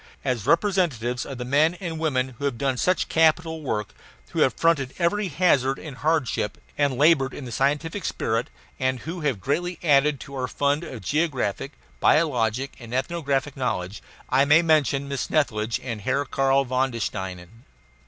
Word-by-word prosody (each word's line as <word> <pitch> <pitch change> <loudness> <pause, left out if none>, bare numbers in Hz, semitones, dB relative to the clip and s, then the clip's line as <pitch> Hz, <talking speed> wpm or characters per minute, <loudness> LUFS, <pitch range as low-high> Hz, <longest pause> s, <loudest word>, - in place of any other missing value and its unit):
As 125 -4 -1
representatives 155 - +1
of 135 - -6
the 125 - -5
men 150 +6 +3
and 170 -3 -5
women 130 -5 0
who 140 - -3
have 135 -4 -1
done 135 +1 0
such 180 +8 +1
capital 160 0 +2
work, 105 -7 -3 0.4
who - - -3
have - - +3
fronted 145 -6 +1
every 190 +4 +1
hazard 140 -6 +2
and 145 -5 -9
hardship 130 -7 0 0.2
and 140 -3 +1
labored 145 -2 +4
in 145 - -7
the 120 - -7
scientific 150 - 0
spirit, 115 -5 -1 0.3
and 130 -1 0
who 170 +2 -6
have 145 -4 +1
added 95 - -17
greatly 175 - -1 0.4
to 140 0 -11
our 130 -2 -2
fund 145 +4 0
of 130 -9 -7
geographic, 140 -5 -1 0.3
biologic, 130 -4 +2
and 120 0 -7
ethnographic 140 -1 -1
knowledge, 100 -7 -3 0.3
I 130 +2 +3
may 150 +4 +5
mention 145 -4 +2
Miss 140 -1 -3
Snethlage 115 -6 0
and 115 -5 -5
Herr 135 +6 0
Karl 135 0 +2
von 130 +1 +1
den 115 -2 -6
Steinen. 95 +2 -5
140 Hz, 170 wpm, -24 LUFS, 125-160 Hz, 0.4 s, may